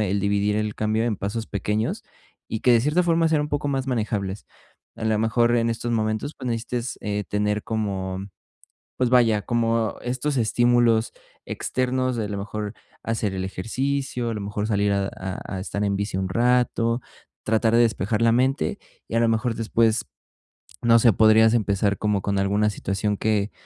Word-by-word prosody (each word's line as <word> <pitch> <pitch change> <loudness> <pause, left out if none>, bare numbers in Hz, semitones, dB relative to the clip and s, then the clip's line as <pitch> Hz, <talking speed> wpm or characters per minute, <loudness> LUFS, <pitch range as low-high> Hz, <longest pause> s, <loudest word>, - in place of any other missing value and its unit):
el 100 -1 0
dividir 100 +1 +1
el 105 -1 -1
cambio 110 +1 0
en 115 -3 0
pasos 110 +4 -4
pequeños, 105 +2 -2 0.5
y 110 - -3
que 125 - +4
de 115 - +5
cierta 150 +6 +2
forma 165 -1 +3
sean 160 -2 +2
un 150 - -4
poco 145 0 -2
más 135 -1 -1
manejables. 105 -5 -2 0.5
A - - -5
la 110 -1 +2
mejor, 120 +2 +2
en 115 0 +1
estos 115 +1 -3
momentos, 110 +5 -1
pues, - - -7
necesites, 120 +1 -3
eh, 105 0 -2
tener 105 0 0
como, 95 -3 -3 0.7
pues, 125 -1 +1
vaya, 115 -5 +4
como 115 -1 0
estos 130 +4 -2
estímulos 120 -1 +3 0.3
externos 130 0 -1
de, 110 - -1
a - - -4
lo 100 - -3
mejor, 105 +1 -5 0.3
hacer 110 -3 -1
el 95 - -2
ejercicio, 125 +6 -2
a - - -2
lo 105 - -4
mejor, 105 +1 -3
salir 100 -2 +1
a 100 -1 0
a 95 +1 -6
a - - -4
estar 100 +1 -3
en 100 -1 0
bici 100 -1 -2
un 95 0 -1
rato, 120 +1 +1 0.4
tratar 110 +1 +1
de 120 - +6
despejar 110 -1 +1
la 115 - +5
mente. 130 - +1 0.3
Y, - - -9
a - - +4
lo 115 - +3
mejor 115 +1 0
después, 115 0 +1 0.8
no 115 0 +6
sé, 115 0 +5
podrías 110 +2 +5
empezar 100 -2 +1
como 105 -2 0
con 100 0 -1
alguna 100 +2 +2
situación 105 +1 -2
que 105 -1 0
110 Hz, 185 wpm, -24 LUFS, 105-120 Hz, 0.8 s, de